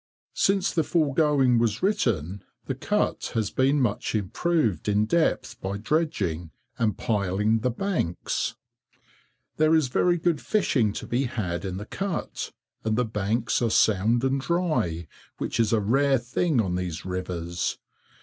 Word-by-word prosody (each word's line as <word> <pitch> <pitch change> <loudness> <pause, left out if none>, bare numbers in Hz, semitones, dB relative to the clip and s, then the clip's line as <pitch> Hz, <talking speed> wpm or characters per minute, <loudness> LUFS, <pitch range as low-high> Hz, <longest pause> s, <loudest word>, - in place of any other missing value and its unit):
[Since 195 -1 +2
the 165 - +2
foregoing 145 -6 +3
was 115 - 0
written, 100 - 0 0.2
the - - -2
Cut - - -1
has 110 -3 0
been 135 +3 +2
much 115 -3 0
improved 110 - 0
in 105 +1 +3
depth 120 -3 0
by 95 +1 -3
dredging, 100 - -1 0.3
and 110 -2 +1
piling 105 +1 +1
the 125 +3 0
banks.] 125 - -2 1.0
There 155 +1 +4
is 155 -5 +2
very 175 +7 +2
good 165 -2 0
fishing 130 - +1
to - - -5
be 125 +3 0
had 95 -8 -3
in 95 -2 -4
the 105 - -6
cut, 195 - -4 0.3
and 110 -1 0
the 125 - +2
banks 110 +3 -1
are 115 - +2
sound 110 +3 +3
and 135 0 +1
dry, 155 - 0 0.3
which - - -3
is 115 -2 +3
a 115 - +3
rare 135 +6 +3
thing 125 +5 0
on 95 -5 0
these 90 -2 -3
rivers. 90 -2 -3
115 Hz, 150 wpm, -26 LUFS, 100-150 Hz, 1.0 s, There